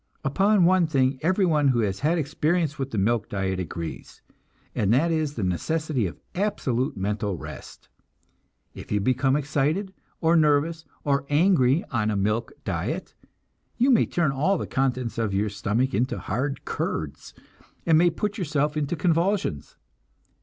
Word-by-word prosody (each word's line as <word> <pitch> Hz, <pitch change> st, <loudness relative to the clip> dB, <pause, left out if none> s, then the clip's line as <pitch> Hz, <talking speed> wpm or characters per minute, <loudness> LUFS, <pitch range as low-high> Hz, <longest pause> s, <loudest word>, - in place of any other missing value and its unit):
Upon 195 Hz, +6 st, +3 dB
one 180 Hz, -1 st, +4 dB
thing 135 Hz, -3 st, +1 dB
everyone 165 Hz, -4 st, +2 dB
who 125 Hz, -3 st, +3 dB
has 100 Hz, -3 st, -1 dB
had 160 Hz, +4 st, +1 dB
experience 155 Hz, +1 st, 0 dB
with 135 Hz, 0 st, -2 dB
the 115 Hz, -, -4 dB
milk 110 Hz, +2 st, +1 dB
diet 95 Hz, -2 st, -2 dB
agrees, 85 Hz, -2 st, -6 dB, 0.5 s
and 100 Hz, -1 st, +1 dB
that 150 Hz, +8 st, +3 dB
is 155 Hz, -3 st, -1 dB
the 110 Hz, -, -3 dB
necessity 130 Hz, -, -1 dB
of 85 Hz, -, -9 dB
absolute 140 Hz, -, -1 dB
mental 100 Hz, 0 st, -2 dB
rest. -, -, -10 dB, 0.9 s
If -, -, -10 dB
you 105 Hz, -, +2 dB
become 130 Hz, +5 st, +2 dB
excited, 150 Hz, +7 st, 0 dB, 0.3 s
or 165 Hz, +1 st, +3 dB
nervous, 160 Hz, +1 st, +2 dB, 0.2 s
or 140 Hz, -1 st, 0 dB
angry 150 Hz, -1 st, +3 dB
on 110 Hz, -4 st, 0 dB
a 105 Hz, -, 0 dB
milk 105 Hz, +3 st, 0 dB
diet, -, -, -3 dB, 0.6 s
you 255 Hz, +4 st, +4 dB
may 235 Hz, -, +4 dB
turn 170 Hz, -5 st, +1 dB
all 155 Hz, +9 st, +1 dB
the -, -, -3 dB
contents 130 Hz, -3 st, -1 dB
of 105 Hz, -4 st, -1 dB
your 105 Hz, +2 st, +1 dB
stomach 105 Hz, +6 st, -1 dB
into 120 Hz, +6 st, 0 dB
hard 135 Hz, +7 st, -3 dB
curds, 80 Hz, -3 st, -4 dB, 0.5 s
and 165 Hz, -, +4 dB
may 175 Hz, +2 st, +5 dB
put 210 Hz, +6 st, -3 dB
yourself 150 Hz, -3 st, 0 dB
into 150 Hz, +2 st, -1 dB
convulsions. 170 Hz, -, 0 dB
140 Hz, 155 wpm, -25 LUFS, 115-165 Hz, 0.9 s, may